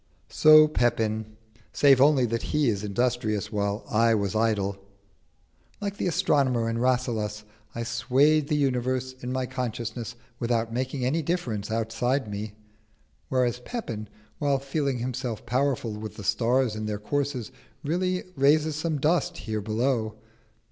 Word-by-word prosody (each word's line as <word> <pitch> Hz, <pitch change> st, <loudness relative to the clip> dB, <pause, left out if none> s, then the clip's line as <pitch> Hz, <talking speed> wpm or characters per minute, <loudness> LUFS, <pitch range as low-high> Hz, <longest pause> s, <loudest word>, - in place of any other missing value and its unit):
So 155 Hz, 0 st, +7 dB
Pepin; 110 Hz, -5 st, 0 dB, 0.3 s
save 135 Hz, -3 st, +5 dB
only 140 Hz, -3 st, +5 dB
that 115 Hz, 0 st, -1 dB
he 150 Hz, -4 st, +1 dB
is 105 Hz, -2 st, -1 dB
industrious 110 Hz, 0 st, -1 dB
while 100 Hz, 0 st, -2 dB
I 115 Hz, +1 st, +3 dB
was 100 Hz, -2 st, -1 dB
idle. 105 Hz, -3 st, +1 dB, 1.0 s
Like 205 Hz, -1 st, -4 dB
the -, -, -1 dB
astronomer 140 Hz, -9 st, +2 dB
in 115 Hz, 0 st, -1 dB
Rasselas, 115 Hz, -4 st, 0 dB, 0.3 s
I 115 Hz, -, -2 dB
swayed 140 Hz, +6 st, +2 dB
the 150 Hz, -, +1 dB
universe 130 Hz, -1 st, 0 dB
in 125 Hz, -, -4 dB
my 130 Hz, 0 st, -1 dB
consciousness 120 Hz, -2 st, -4 dB, 0.2 s
without 115 Hz, -1 st, 0 dB
making 130 Hz, +1 st, -2 dB
any 155 Hz, +6 st, +1 dB
difference 135 Hz, -, -2 dB
outside 115 Hz, +4 st, -1 dB
me; 105 Hz, +1 st, -5 dB, 0.8 s
whereas 125 Hz, -2 st, +1 dB
Pepin, 115 Hz, -, -5 dB, 0.3 s
while 140 Hz, -2 st, +2 dB
feeling 140 Hz, 0 st, -1 dB
himself 125 Hz, -2 st, -4 dB
powerful 130 Hz, -2 st, 0 dB
with 105 Hz, +1 st, -7 dB
the 105 Hz, -, -8 dB
stars 115 Hz, +4 st, +1 dB
in 110 Hz, 0 st, -4 dB
their 105 Hz, -1 st, -2 dB
courses, 130 Hz, +1 st, -2 dB, 0.3 s
really 180 Hz, +4 st, 0 dB
raises 150 Hz, +2 st, +3 dB
some 155 Hz, 0 st, -1 dB
dust 155 Hz, +5 st, +1 dB
here 110 Hz, -1 st, -3 dB
below. 110 Hz, +1 st, -1 dB
125 Hz, 140 wpm, -26 LUFS, 110-140 Hz, 1.0 s, So